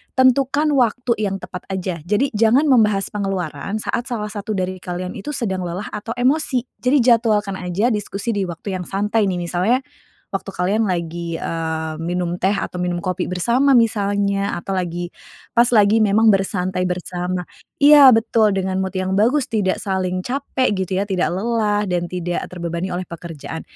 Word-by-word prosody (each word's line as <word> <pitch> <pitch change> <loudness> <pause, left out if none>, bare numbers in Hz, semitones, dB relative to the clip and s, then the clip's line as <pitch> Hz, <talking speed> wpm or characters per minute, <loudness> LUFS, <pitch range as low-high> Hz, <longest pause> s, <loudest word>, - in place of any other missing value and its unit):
tentukan 275 +3 +3
waktu 250 -2 +1
yang 200 -2 -1
tepat 180 -1 -8
aja. 185 -2 -3
Jadi 225 +8 +1
jangan 225 +6 +3
membahas 215 -9 +3
pengeluaran 195 -3 -3
saat 235 +3 -2
salah 215 -4 -3
satu 210 0 -4
dari 185 0 -2
kalian 180 0 -5
itu 295 +9 -5
sedang 190 -8 -2
lelah 180 +4 -5
atau 225 +3 -5
emosi. 255 0 +1 0.2
Jadi 255 +1 +3
jadwalkan 215 -5 +2
aja 185 +7 0
diskusi 205 +1 -2
di 200 -3 -1
waktu 170 +4 -6
yang 180 - -6
santai 205 +2 0
nih 185 - -1
misalnya 180 +7 +1 0.5
waktu 195 0 -3
kalian 195 +4 0
lagi, 170 -1 -3
eee, 160 -1 -3
minum 175 +1 -2
teh 190 +2 +3
atau 180 - -4
minum 180 -1 -1
kopi 180 +1 -3
bersama 240 +9 +3
misalnya, 200 -3 +1
atau 185 +3 -4
lagi 175 -1 -3 0.4
pas 240 +1 +4
lagi 215 -1 +4
memang 215 +1 +4
bersantai 185 -1 -1
bersama 180 0 -3 0.3
iya! 290 -1 +8
Betul, 225 -2 +3
dengan 190 0 -1
mood 190 0 -3
yang 185 0 -1
bagus, 245 +8 +2
tidak 210 -7 0
saling 185 -2 -2
capek 260 -2 -1
gitu 190 -1 -2
ya, 200 - 0
tidak 190 -3 0
lelah, 210 +1 0
dan 175 -2 -2
tidak 175 -1 -3
terbebani 170 0 -4
oleh 180 +1 -3
pekerjaan. 165 -2 -7
195 Hz, 165 wpm, -20 LUFS, 180-225 Hz, 0.5 s, iya